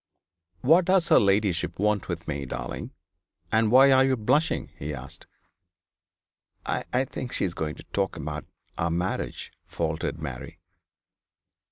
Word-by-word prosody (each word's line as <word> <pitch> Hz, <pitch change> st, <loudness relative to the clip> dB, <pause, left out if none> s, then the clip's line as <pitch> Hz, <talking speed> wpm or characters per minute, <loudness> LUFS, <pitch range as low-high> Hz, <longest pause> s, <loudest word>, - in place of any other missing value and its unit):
'What 165 Hz, +7 st, +5 dB
does 185 Hz, -1 st, +3 dB
her -, -, +7 dB
ladyship 95 Hz, -5 st, +1 dB
want 105 Hz, 0 st, +1 dB
with 85 Hz, -2 st, -5 dB
me, 70 Hz, -3 st, -3 dB
darling? 60 Hz, 0 st, -5 dB, 0.6 s
and 110 Hz, 0 st, +3 dB
why 135 Hz, +4 st, +7 dB
are 130 Hz, 0 st, +6 dB
you 135 Hz, -1 st, +2 dB
blushing?' 130 Hz, +9 st, +1 dB
he 75 Hz, +1 st, -4 dB
asked. 70 Hz, +1 st, -10 dB, 1.4 s
'I -, -, -2 dB
I 130 Hz, +2 st, +2 dB
think 125 Hz, -1 st, -6 dB
she -, -, 0 dB
is 90 Hz, -, -3 dB
going 75 Hz, -2 st, -3 dB
to -, -, -12 dB
talk -, -, 0 dB
about -, -, -5 dB, 0.3 s
our 85 Hz, -, +1 dB
marriage,' 85 Hz, +3 st, -3 dB
faltered 80 Hz, 0 st, -2 dB
Mary. 70 Hz, -6 st, -7 dB
95 Hz, 145 wpm, -26 LUFS, 80-130 Hz, 1.4 s, her